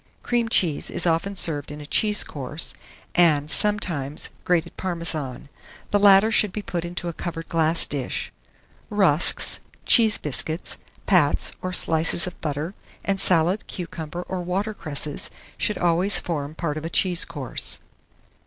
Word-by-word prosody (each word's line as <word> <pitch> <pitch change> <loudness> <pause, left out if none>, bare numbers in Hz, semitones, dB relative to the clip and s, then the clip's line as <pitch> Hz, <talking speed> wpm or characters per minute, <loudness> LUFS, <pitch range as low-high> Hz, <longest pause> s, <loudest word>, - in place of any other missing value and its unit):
Cream 240 -1 0
cheese 165 -9 +2
is - - -1
often 175 +4 0
served 150 -6 -2
in 150 - -8
a 150 - -9
cheese 210 +6 +2
course, 145 +2 -3 0.4
and, 155 -4 +4
sometimes, 165 -7 -1
grated 175 -2 0
Parmesan: 160 -8 -2 0.4
the 205 - +3
latter 200 +2 +6
should 210 -3 +2
he 210 - -4
put 175 -3 -4
into 175 0 -5
a 170 - -3
covered 165 0 -6
glass 165 0 +2
dish. 140 -3 -4 0.6
Rusks, 185 -7 +3 0.3
cheese 225 -3 +6
biscuits, 155 +3 -2 0.3
pats 170 -7 +2
or 185 - -3
slices 165 -1 +4
of 180 - -8
butter, 150 +3 -3 0.3
and 195 -1 0
salad, 180 +3 +2
cucumber, 170 -1 -6
or 185 0 -5
water 195 +5 -2
cresses, 150 -5 -4 0.3
should 210 - -1
always 175 +3 +3
form 150 -3 -4
part 155 -3 -3
of 155 - -6
a - - -3
cheese 180 -1 +2
course. 145 -7 -2
170 Hz, 145 wpm, -23 LUFS, 150-190 Hz, 0.6 s, latter